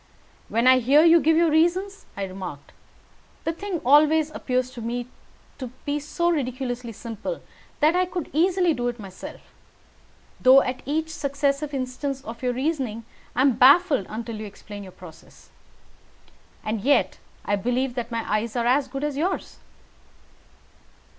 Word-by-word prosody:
"When 230 +2 +1
I 255 0 +7
hear 275 +6 +5
you 335 0 +7
give 320 0 +3
your 335 -1 +4
reasons," 365 +6 +1
I 200 - -2
remarked, 185 -6 -7 0.7
"the 325 - -1
thing 380 0 -4
always 305 +3 +5
appears 255 -3 -2
to 240 - -9
me 240 +2 -3 0.9
so 340 +4 -1
ridiculously 250 -5 -3
simple 230 - -6 0.4
that 310 +3 +4
I 365 0 +2
could 355 -3 -5
easily 355 +2 +3
do 245 -3 -2
it 240 0 -3
myself, 195 -3 -9 1.0
though 265 +1 +7
at 255 0 -4
each 320 +2 -1
successive 280 0 -1
instance 270 0 -4
of 230 -2 -8
your 250 -1 0
reasoning 255 -5 -2 0.3
I 255 - +2
am 265 -4 +3
baffled, 280 - +5
until 225 +1 -5
you 215 0 -6
explain 205 +1 -10
your 190 -2 -10
process. 165 -3 -15 1.1
And 215 -1 -2
yet, 280 +6 +2 0.3
I 205 - +1
believe 245 +5 -1
that 240 -2 -4
my 230 -1 -3
eyes 215 +2 -1
are 235 -1 0
as 265 +3 +3
good 270 +2 -5
as 295 -2 -2
yours." 360 +6 -2
260 Hz, 150 wpm, -24 LUFS, 235-310 Hz, 1.1 s, I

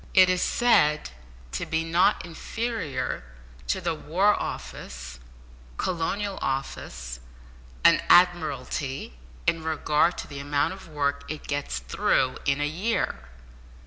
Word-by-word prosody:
It 185 -1 +8
is 180 - +1
said 150 - +3 0.4
to - - -2
be 160 0 0
not 170 +3 +3
inferior 225 - -3 0.4
to 60 - +1
the - - -1
War 180 +7 +2
Office, 65 - -6 0.6
Colonial 190 +3 -1
Office, 60 - -4 0.6
and - - +6
Admiralty 145 - +2 0.3
in 165 - +2
regard 160 +1 +2
to - - -5
the 140 -2 -7
amount 145 +3 0
of 190 -2 -11
work 145 -2 -1
it 155 0 -5
gets 145 - -2
through 95 - +1
in 140 0 +2
a 145 - +1
year! 160 - -2
155 Hz, 120 wpm, -26 LUFS, 140-180 Hz, 0.6 s, It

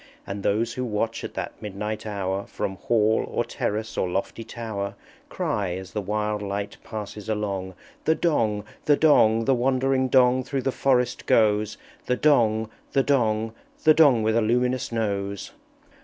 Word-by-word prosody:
And 100 +1 -5
those 110 +4 0
who 125 - -3
watch 115 0 -2
at - - -7
that - - -5
midnight 105 +1 -4
hour 100 -1 -2
From 95 - -3
Hall 110 0 +2
or - - -1
Terrace 110 +2 -3
or 90 - 0
lofty 95 +5 -3
Tower, 110 -3 -5 0.3
Cry, 100 -4 -1
as 95 0 -8
the 105 - -1
wild 105 +1 -1
light 100 0 -4
passes 105 -1 -7
along, 100 -3 -2 0.3
"The 160 - +4
Dong! 110 -12 +1 0.2
the 145 -1 +4
Dong! 115 -7 +4
The 135 - +4
wandering 130 +1 +1
Dong 130 0 +4
through 135 0 -3
the 135 - +1
forest 125 -2 +1
goes! 105 -1 +3 0.3
The 125 - +2
Dong! 110 -6 +3 0.2
the 135 - +3
Dong! 110 -5 +1 0.3
The 155 - +7
Dong 140 -8 +5
with 110 +1 +2
a 115 - +4
luminous 125 +3 +1
Nose!" 100 - -2
110 Hz, 160 wpm, -25 LUFS, 105-125 Hz, 0.3 s, The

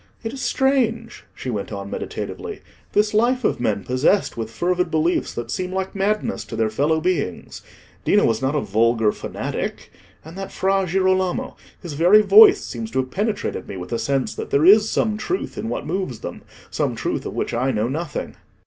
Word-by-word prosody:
It 225 +1 -4
is 270 - -6
strange," 240 -4 0
she 130 - -5
went 105 -2 -4
on 100 -1 -6
meditatively, - - -5 0.3
"this 210 +1 +2
life 245 +4 +2
of - - +1
men 105 -4 0
possessed 130 +10 +1
with 115 -1 -4
fervid 180 +7 0
beliefs 160 +2 +1
that 120 - -5
seem 185 -1 -3
like 190 0 -3
madness 210 +4 -1
to 115 - -7
their 110 -1 0
fellow 150 +7 +1
beings. 160 - -2 0.4
Dino - - +4
was 115 -1 +1
not 135 +3 0
a 150 - +1
vulgar 110 +1 +2
fanatic; - - -5 0.3
and 160 +2 -10
that 195 - -6
Fra 195 0 +1
Girolamo—his 185 -2 -1
very 180 +8 +6
voice 415 - +7
seems 225 -1 -5
to 130 - -1
have 130 0 -8
penetrated 210 +1 -2
me 95 - -6
with 90 +4 -8
a 115 - 0
sense 135 +3 -1
that - - -6
there 140 +3 +3
is 210 +3 +7
some 215 -1 0
truth 370 - -3
in - - -4
what - - -3
moves 185 - -3
them: - - -7 0.3
some - - -1
truth - - -2
of - - -7
which - - -2
I 125 +3 +1
know 110 -3 0
nothing." 150 +4 -4
175 Hz, 190 wpm, -22 LUFS, -, 0.4 s, voice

